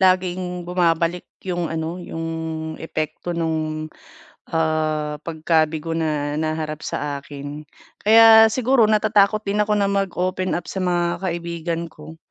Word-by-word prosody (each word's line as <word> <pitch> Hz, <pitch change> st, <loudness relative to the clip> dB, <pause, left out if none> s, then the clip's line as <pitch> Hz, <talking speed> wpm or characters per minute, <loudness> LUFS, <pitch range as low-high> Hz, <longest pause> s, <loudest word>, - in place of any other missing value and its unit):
laging 180 Hz, -1 st, +1 dB
bumabalik 175 Hz, -1 st, 0 dB, 0.2 s
yung 175 Hz, -3 st, -2 dB
ano, 165 Hz, +2 st, -3 dB
yung 165 Hz, -2 st, -6 dB, 0.6 s
epekto 160 Hz, +2 st, -4 dB
nung, 155 Hz, -1 st, -2 dB, 0.6 s
ah, 155 Hz, -2 st, 0 dB
pagkabigo 160 Hz, 0 st, 0 dB
na 150 Hz, -2 st, -1 dB
naharap 155 Hz, -1 st, -2 dB
sa 145 Hz, -1 st, -3 dB
akin. 145 Hz, +1 st, -8 dB, 0.4 s
Kaya 225 Hz, +1 st, +8 dB
siguro 250 Hz, -2 st, +3 dB
natatakot 215 Hz, -1 st, +3 dB
din 205 Hz, +1 st, 0 dB
ako 210 Hz, 0 st, +1 dB
na 200 Hz, -1 st, +2 dB
mag-open 185 Hz, -1 st, -1 dB
up 175 Hz, -, -5 dB
sa 190 Hz, -, -4 dB
mga 175 Hz, -1 st, 0 dB
kaibigan 170 Hz, -1 st, -3 dB
ko. 155 Hz, +1 st, -12 dB
170 Hz, 120 wpm, -22 LUFS, 155-185 Hz, 0.6 s, Kaya